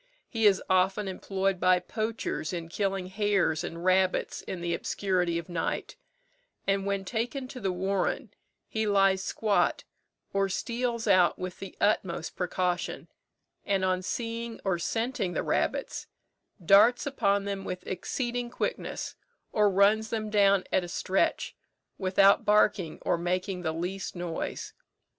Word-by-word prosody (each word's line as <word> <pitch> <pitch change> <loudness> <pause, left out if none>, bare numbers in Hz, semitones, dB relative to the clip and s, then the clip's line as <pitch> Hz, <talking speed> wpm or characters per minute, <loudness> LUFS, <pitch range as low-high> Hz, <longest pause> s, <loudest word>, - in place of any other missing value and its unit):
He 225 -3 +3
is 195 -2 +3
often 190 +2 +2
employed 195 0 -1
by 185 0 +5
poachers 215 -2 -3
in 170 -2 -4
killing 195 0 -1
hares 190 -4 +1
and 170 0 -6
rabbits 185 0 +2
in 185 - -6
the 170 0 -1
obscurity 180 -2 0
of 170 - -5
night; 175 -2 -3 0.7
and 195 0 +1
when 200 -1 -1
taken 240 +5 -2
to 255 - -7
the 195 -4 -1
warren, 195 +5 -1 0.3
he 220 -1 -1
lies 195 -2 +4
squat, 210 0 +1 0.5
or 195 0 +1
steals 235 +3 -2
out 185 -4 +4
with 185 0 -6
the 195 -2 -9
utmost 175 -6 0
precaution, 180 0 -2 0.5
and 195 -2 +1
on 185 0 +1
seeing 230 +3 -4
or 190 -3 +1
scenting 225 -2 -1
the - - -1
rabbits, - - -1 0.6
darts 210 +7 +6
upon 200 -8 +1
them 200 -1 -3
with 180 -1 -5
exceeding 240 +6 -3
quickness - - -3 0.4
or 210 -1 +4
runs 205 +3 +3
them 215 -2 -3
down 200 -2 +4
at 185 - +2
a - - -5
stretch, 185 +2 0 0.4
without 195 +1 +4
barking 205 -5 +3
or 170 - +1
making 180 +2 -1
the 160 -2 -1
least 180 +5 -4
noise. 175 -2 -4
195 Hz, 140 wpm, -28 LUFS, 180-210 Hz, 0.7 s, darts